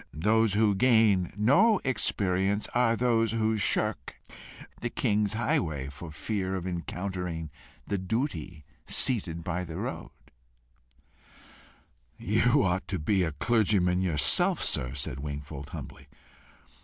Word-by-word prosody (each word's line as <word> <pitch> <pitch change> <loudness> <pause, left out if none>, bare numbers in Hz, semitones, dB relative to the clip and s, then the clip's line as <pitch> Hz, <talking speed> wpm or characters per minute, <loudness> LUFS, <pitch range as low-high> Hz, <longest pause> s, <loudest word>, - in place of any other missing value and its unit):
Those 105 +5 +2
who 105 -1 +3
gain 105 -4 +3
no 180 - +4
experience 100 -5 0
are 120 -1 +3
those 115 -2 +1
who 110 -1 +1
shirk 100 - 0 0.6
the - - -3
king's 105 0 0
highway, 80 - -1
for 80 +3 -9
fear 95 +4 -3
of 90 -2 -4
encountering 90 -2 -4 0.3
the 100 - -2
Duty 90 - -3 0.2
seated 95 -10 +1
by 90 +2 -2
the 80 -2 -7
roadside." - - -7 1.9
"You - - +2
ought 95 0 -1
to 95 - -2
be 95 +5 +1
a 80 -4 -1
clergyman 95 -3 +2
yourself, 75 -7 +2
sir," 65 +1 -2
said 70 -2 -4
Wingfold, 70 0 -7
humbly. - - -9
95 Hz, 120 wpm, -28 LUFS, 80-110 Hz, 1.9 s, no